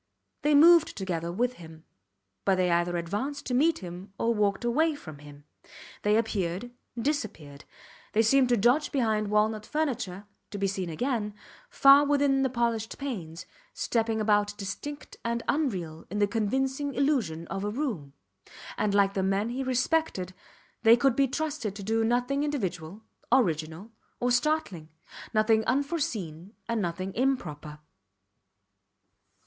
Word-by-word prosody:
They 295 Hz, 0 st, +3 dB
moved 330 Hz, +2 st, +6 dB
together 170 Hz, -4 st, -3 dB
with 245 Hz, +7 st, 0 dB
him; 160 Hz, -1 st, -12 dB, 0.6 s
but 195 Hz, -, +3 dB
they 180 Hz, -1 st, +1 dB
either 175 Hz, +1 st, +1 dB
advanced 210 Hz, +12 st, -3 dB
to 250 Hz, -, -3 dB
meet 300 Hz, -2 st, +2 dB
him, 180 Hz, +3 st, -9 dB
or 230 Hz, 0 st, +1 dB
walked 205 Hz, 0 st, 0 dB
away 310 Hz, +6 st, +2 dB
from 155 Hz, -, -11 dB
him; 145 Hz, 0 st, -13 dB, 0.6 s
they 210 Hz, +1 st, +3 dB
appeared, 205 Hz, -1 st, -2 dB, 0.3 s
disappeared; 215 Hz, -, -3 dB, 0.5 s
they 225 Hz, -, +4 dB
seemed 255 Hz, +3 st, +4 dB
to 240 Hz, -, +3 dB
dodge 245 Hz, +8 st, +3 dB
behind 220 Hz, -5 st, +1 dB
walnut 210 Hz, +1 st, +1 dB
furniture, 245 Hz, -, -3 dB, 0.2 s
to 205 Hz, -, -6 dB
be 200 Hz, -, 0 dB
seen 190 Hz, -2 st, -2 dB
again, 210 Hz, -, -2 dB, 0.3 s
far 280 Hz, -, +7 dB
within 285 Hz, -2 st, +2 dB
the 265 Hz, -, +2 dB
polished 235 Hz, -3 st, -1 dB
panes, 180 Hz, -, -6 dB, 0.3 s
stepping 225 Hz, -1 st, 0 dB
about 205 Hz, -1 st, +1 dB
distinct 215 Hz, +9 st, -7 dB
and 235 Hz, 0 st, -2 dB
unreal 185 Hz, -, -2 dB
in 205 Hz, -, -4 dB
the 205 Hz, -, +4 dB
convincing 265 Hz, +7 st, -1 dB
illusion 240 Hz, -, 0 dB
of 195 Hz, 0 st, -4 dB
a 205 Hz, -, -1 dB
room. 210 Hz, -, -3 dB, 0.7 s
And 205 Hz, -1 st, +1 dB
like 200 Hz, -1 st, +3 dB
the 195 Hz, -, -1 dB
men 195 Hz, +3 st, 0 dB
he 250 Hz, +3 st, -3 dB
respected 255 Hz, -, 0 dB, 0.5 s
they 230 Hz, 0 st, +7 dB
could 255 Hz, 0 st, +2 dB
be 275 Hz, 0 st, +3 dB
trusted 285 Hz, -7 st, -3 dB
to 200 Hz, -, -7 dB
do 225 Hz, +3 st, +1 dB
nothing 245 Hz, +5 st, +1 dB
individual, 195 Hz, -, -4 dB, 0.3 s
original, 165 Hz, -, +1 dB, 0.3 s
or 245 Hz, 0 st, +1 dB
startling 245 Hz, -, 0 dB, 0.4 s
nothing 220 Hz, 0 st, +3 dB
unforeseen 245 Hz, -, -2 dB
and 230 Hz, -2 st, -1 dB
nothing 185 Hz, +1 st, -3 dB
improper. 160 Hz, -, -2 dB
220 Hz, 145 wpm, -28 LUFS, 185-265 Hz, 0.7 s, far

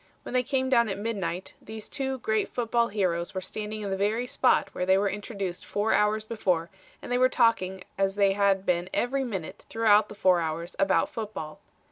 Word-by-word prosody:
When -, -, -7 dB
they 255 Hz, -, +4 dB
came 260 Hz, +1 st, -1 dB
down 235 Hz, -4 st, +3 dB
at 195 Hz, -, -3 dB
midnight 195 Hz, -4 st, -3 dB
these 220 Hz, 0 st, -8 dB
two 265 Hz, -1 st, -3 dB
great 220 Hz, -3 st, 0 dB
football 235 Hz, -1 st, +1 dB
heroes 185 Hz, -4 st, -1 dB
were -, -, 0 dB
standing 215 Hz, +3 st, -5 dB
in 200 Hz, -2 st, -3 dB
the -, -, +1 dB
very 210 Hz, +5 st, 0 dB
spot 250 Hz, 0 st, +2 dB
where -, -, -2 dB
they 190 Hz, +1 st, +4 dB
were 200 Hz, +1 st, +2 dB
introduced 200 Hz, -3 st, -4 dB
four 205 Hz, +2 st, 0 dB
hours 215 Hz, +1 st, +2 dB
before 180 Hz, -7 st, -1 dB, 0.3 s
and -, -, -7 dB
they 245 Hz, -, +2 dB
were 255 Hz, 0 st, +5 dB
talking 190 Hz, -7 st, +1 dB, 0.2 s
as 195 Hz, 0 st, +1 dB
they 200 Hz, -1 st, +3 dB
had 195 Hz, -1 st, +2 dB
been 175 Hz, 0 st, 0 dB
every 265 Hz, +3 st, 0 dB
minute 195 Hz, -6 st, -5 dB
throughout 220 Hz, -2 st, +4 dB
the -, -, -9 dB
four 185 Hz, -3 st, +4 dB
hours 165 Hz, +1 st, -4 dB
about 195 Hz, -1 st, +2 dB
football. 205 Hz, -9 st, -6 dB
205 Hz, 200 wpm, -27 LUFS, 190-230 Hz, 0.3 s, were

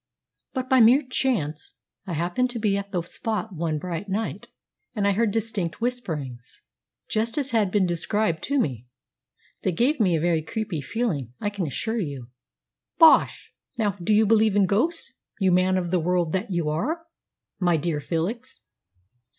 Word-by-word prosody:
But 260 Hz, -1 st, -3 dB
by 260 Hz, -1 st, +4 dB
mere 245 Hz, +6 st, +6 dB
chance 215 Hz, -, -1 dB, 0.3 s
I 180 Hz, -, -3 dB
happened 175 Hz, +10 st, 0 dB
to 245 Hz, -, -5 dB
be 210 Hz, -2 st, +1 dB
at 200 Hz, 0 st, -4 dB
the 175 Hz, -3 st, -1 dB
spot 215 Hz, +3 st, -4 dB
one 160 Hz, -2 st, -2 dB
bright 175 Hz, +4 st, -5 dB
night, 215 Hz, +4 st, -3 dB, 0.5 s
and 205 Hz, -2 st, +1 dB
I -, -, +4 dB
heard 220 Hz, +3 st, +2 dB
distinct 205 Hz, -5 st, -2 dB
whisperings, 160 Hz, -, -4 dB, 0.4 s
just 225 Hz, +3 st, -1 dB
as 275 Hz, -2 st, 0 dB
had 220 Hz, -4 st, +2 dB
been 195 Hz, 0 st, +2 dB
described 175 Hz, +1 st, 0 dB
to 285 Hz, -, 0 dB
me. 125 Hz, -, -1 dB, 0.7 s
They 185 Hz, -, 0 dB
gave 250 Hz, -, +1 dB
me 185 Hz, -6 st, +3 dB
a -, -, +1 dB
very 165 Hz, 0 st, +1 dB
creepy 190 Hz, -2 st, -4 dB
feeling, 145 Hz, -, -2 dB
I 205 Hz, -, -2 dB
can 195 Hz, -5 st, -3 dB
assure 220 Hz, -, -2 dB
you." 140 Hz, -, -5 dB, 0.7 s
"Bosh! 325 Hz, -2 st, +5 dB, 0.2 s
Now, 215 Hz, -3 st, +1 dB
do 195 Hz, +1 st, -3 dB
you 220 Hz, +1 st, +5 dB
believe 215 Hz, -1 st, +3 dB
in 200 Hz, -1 st, +5 dB
ghosts, 260 Hz, -, 0 dB, 0.3 s
you 190 Hz, -2 st, +3 dB
man 185 Hz, +1 st, +3 dB
of 175 Hz, -2 st, -2 dB
the 185 Hz, -, +2 dB
world 175 Hz, -1 st, 0 dB
that 190 Hz, +4 st, -1 dB
you 175 Hz, -4 st, -1 dB
are, 305 Hz, -, -2 dB, 0.5 s
my 175 Hz, -3 st, +3 dB
dear 155 Hz, -1 st, -2 dB
Felix?" 195 Hz, -, -3 dB
195 Hz, 170 wpm, -25 LUFS, 170-225 Hz, 0.7 s, mere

